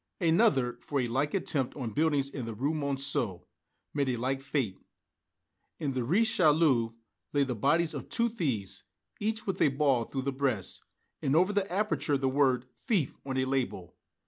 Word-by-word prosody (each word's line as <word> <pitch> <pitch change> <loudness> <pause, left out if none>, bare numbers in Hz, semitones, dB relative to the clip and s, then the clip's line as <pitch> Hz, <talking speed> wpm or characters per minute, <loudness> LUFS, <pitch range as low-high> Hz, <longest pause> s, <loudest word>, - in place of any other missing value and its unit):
Another, 160 - +3
for 145 - -2
a 125 - +1
like 135 +7 0
attempt 145 -8 -1
on 120 -5 -3
buildings 145 -2 +2
in 140 -3 -5
the 115 -1 -5
Rue 140 +8 0
Monceau, 140 - -1 0.5
met 140 -2 +1
a 125 - +1
like 130 +3 -1
fate. 135 -8 -2 1.0
In 150 -4 -2
the 130 -1 -1
Rue 175 - +3
Richelieu 155 - +3 0.4
lay 145 - +4
the 130 -2 -1
bodies 155 +8 +2
of - - -6
two 235 - +2
thieves, 135 - -3 0.4
each 220 +1 -2
with 190 -2 -2
a - - +6
ball 135 -4 +2
through 135 +2 -4
the 140 - 0
breast, 130 -7 -1 0.4
and 135 - +1
over 185 +5 +4
the 200 -2 0
aperture 160 -8 +1
the 135 0 0
word 130 -2 +2 0.2
"Thief" 195 - +1
on 130 -1 -2
a 130 - +2
label. 130 -9 -2
140 Hz, 175 wpm, -30 LUFS, 130-160 Hz, 1.0 s, a